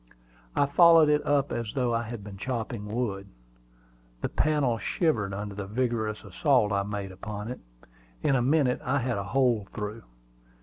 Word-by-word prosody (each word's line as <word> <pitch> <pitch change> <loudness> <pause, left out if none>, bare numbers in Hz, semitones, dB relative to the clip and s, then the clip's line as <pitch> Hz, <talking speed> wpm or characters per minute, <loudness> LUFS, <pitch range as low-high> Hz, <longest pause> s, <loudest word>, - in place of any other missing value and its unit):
I 145 - +4
followed 165 +1 +6
it 150 0 +3
up 145 -1 +2
as 115 -3 -3
though 125 -3 +1
I 115 - +1
had 115 -2 -7
been 100 -1 -9
chopping 115 -3 -4
wood. 105 -3 -3 0.9
The - - -1
panel 145 -7 +1
shivered 110 - 0
under 100 +1 -5
the 100 0 -6
vigorous 110 -1 -1
assault 105 +3 +2
I 100 -1 +2
made 100 -1 -4
upon 105 +3 -6
it. 125 - -7 0.6
In 140 - +3
a 125 - +2
minute, 135 0 +2
I 140 +1 +1
had 120 -5 -1
a - - -3
hole 115 -1 +1
through. 105 +1 -4
115 Hz, 170 wpm, -27 LUFS, 105-135 Hz, 0.9 s, followed